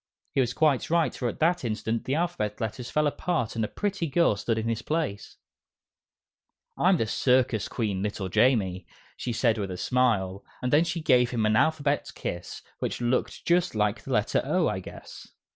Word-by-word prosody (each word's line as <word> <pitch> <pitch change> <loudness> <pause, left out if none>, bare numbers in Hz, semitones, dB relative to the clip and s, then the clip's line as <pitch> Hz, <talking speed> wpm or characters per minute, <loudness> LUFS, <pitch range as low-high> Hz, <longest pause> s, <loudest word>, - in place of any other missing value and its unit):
He 135 - +3
was 125 -1 -1
quite 150 -5 +2
right, 170 0 +2
for 125 - -3
at - - -4
that 175 +1 +2
instant 115 0 -2
the 135 - 0
Alphabet 155 -12 -2
Letters 120 +2 -4
fell 150 0 +1
apart 145 -5 -1
and 115 - 0
a - - 0
pretty 200 - -2
girl 150 -5 +3
stood 110 +3 -1
in 110 0 -2
his 115 0 -1
place. 150 -11 -3 1.4
"I'm 185 +1 +3
the 115 - 0
Circus 125 -1 +2
Queen, 105 -5 -2
little 100 -1 -3
Jamie," 95 -4 +2 0.3
she 125 - -4
said 115 -1 +1
with 100 -2 -3
a 90 - -5
smile, 100 -6 +1 0.2
and 125 +1 -2
then 155 +3 +5
she 170 0 -3
gave 125 -4 +4
him 115 -3 0
an 110 0 +3
alphabet 145 +2 +1
kiss, 85 0 -6 0.2
which - - -3
looked 120 +1 -1
just 175 -4 +2
like 105 -1 0
the - - -8
letter - - +2
O, - - +1
I - - -1
guess. - - -11
120 Hz, 190 wpm, -27 LUFS, 110-150 Hz, 1.4 s, then